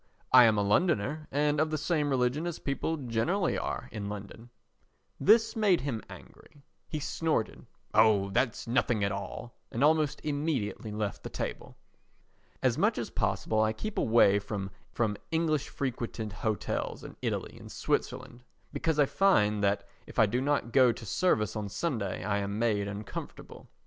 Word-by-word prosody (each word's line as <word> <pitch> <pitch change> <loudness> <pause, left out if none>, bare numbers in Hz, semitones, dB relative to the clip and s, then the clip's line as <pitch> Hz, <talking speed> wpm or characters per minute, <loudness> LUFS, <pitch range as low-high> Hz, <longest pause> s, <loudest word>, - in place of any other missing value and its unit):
I 125 -1 +9
am 110 -2 +4
a 105 - +2
Londoner 150 - +1
and 145 +1 +1
of 155 - +1
the 155 - -1
same 150 -1 0
religion 130 +5 +1
as 170 - -4
people 145 +3 -2
generally 145 - 0
are - - -3
in 105 -2 -5
London." 105 +3 -8 0.7
This 225 +3 +4
made 205 - +3
him 125 -5 -3
angry. 145 - -14 0.3
He 155 - -3
snorted: 150 -5 -2 0.3
"Oh, 105 -3 +4
that's 120 +1 0
nothing 120 -3 +1
at 100 - +1
all;" 100 +4 -6 0.2
and 120 - -1
almost 155 -1 +3
immediately 145 -8 -2
left 105 -1 -3
the - - -6
table. - - -5 0.9
As - - +2
much - - +2
as - - -4
possible 110 0 0
I 110 0 +2
keep 215 - -4
away 110 -3 +5
from 100 -1 -4 0.6
English 160 -3 0
frequented 115 -5 -4
hotels 110 +2 -2
in - - -9
Italy - - -3
and - - -11
Switzerland 120 +1 -2 0.3
because 160 -2 0
I 145 - +5
find 105 - +3
that 100 0 +1 0.2
if - - -12
I 110 - +6
do 120 +5 -1
not 140 -4 0
go 130 -2 +6
to 115 - -8
service 105 - +1
on 105 -2 -3
Sunday 110 - -2
I 100 +1 0
am 100 +1 -3
made 105 -3 +1
uncomfortable. 100 +1 -8
120 Hz, 160 wpm, -30 LUFS, 105-150 Hz, 0.9 s, I